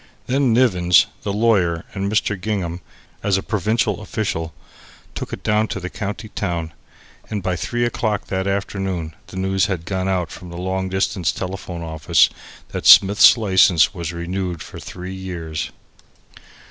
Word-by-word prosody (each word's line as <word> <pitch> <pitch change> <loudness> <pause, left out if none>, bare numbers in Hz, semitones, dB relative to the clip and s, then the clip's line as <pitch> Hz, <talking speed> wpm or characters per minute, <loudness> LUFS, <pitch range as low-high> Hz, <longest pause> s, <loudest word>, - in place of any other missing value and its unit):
Then 130 -1 +2
Nivens, 90 -8 +4 0.2
the 100 - -3
lawyer, 100 -6 +2
and 100 +1 -2
Mr. 105 -1 +1
Gingham 90 -3 -3 0.4
(as 100 -2 +2
a 95 - -3
provincial 105 0 0
official) 90 -7 -3 0.6
took - - -6
it - - -6
down 105 +1 +2
to 100 - -4
the 90 0 -6
county 105 +1 -5
town, 85 -5 -3 0.6
and 105 -3 -3
by 90 -1 0
three 120 +8 -1
o'clock 110 -3 -1
that 95 0 -2
afternoon 95 -4 -2
the 95 - -9
news 95 +1 +1
had 90 -5 -3
gone 95 0 -2
out 90 -3 -1
from 90 - -10
the 85 - -8
long 95 +1 -2
distance 95 -2 0
telephone 90 -2 -5
office 80 -2 +3 0.4
that - - -3
Smith's 100 +4 +8
license 95 -6 +4
was 85 -4 -4
renewed 85 -1 -4
for - - -10
three 90 +1 -7
years. 85 -5 -5
95 Hz, 155 wpm, -21 LUFS, 85-105 Hz, 0.6 s, Smith's